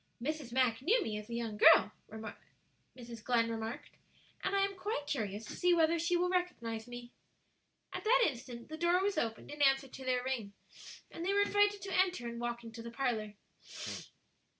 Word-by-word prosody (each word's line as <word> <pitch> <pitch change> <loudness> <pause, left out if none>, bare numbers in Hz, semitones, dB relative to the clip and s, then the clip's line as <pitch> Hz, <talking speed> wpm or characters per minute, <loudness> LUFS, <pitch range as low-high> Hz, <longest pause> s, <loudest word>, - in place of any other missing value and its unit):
"Mrs. 290 0 -3
Mack 250 -2 +2
knew 435 - +4
me 215 -1 -3
as 210 +2 -11
a 235 - -4
young 225 -3 -3
girl," 210 - +7 1.1
Mrs. 235 -3 -9
Glenn 230 -2 +2
remarked, 225 +1 -5 0.5
"and 385 +1 0
I 395 0 +4
am 395 0 -5
quite 375 -5 -3
curious 215 -6 -3
to - - -7
see 355 -1 +3
whether 330 0 +3
she 345 +2 +2
will 355 +1 +2
recognize 245 -12 -2
me." 245 0 -8 0.8
At - - -4
that 485 +2 +5
instant 245 -3 -6
the 315 - -6
door 345 +2 +3
was 400 -5 +1
opened 225 +1 -3
in 295 0 -6
answer 270 -1 +4
to 265 +1 -10
their 250 -1 0
ring, 240 -6 -3 0.6
and 335 - -6
they 385 +3 +1
were 405 0 +4
invited 410 0 +2
to 390 -1 -3
enter 365 -10 +2
and 235 0 -5
walk 240 0 -3
into 230 0 -8
the 235 - -7
parlor. 230 -4 -2
260 Hz, 190 wpm, -34 LUFS, 235-355 Hz, 1.1 s, girl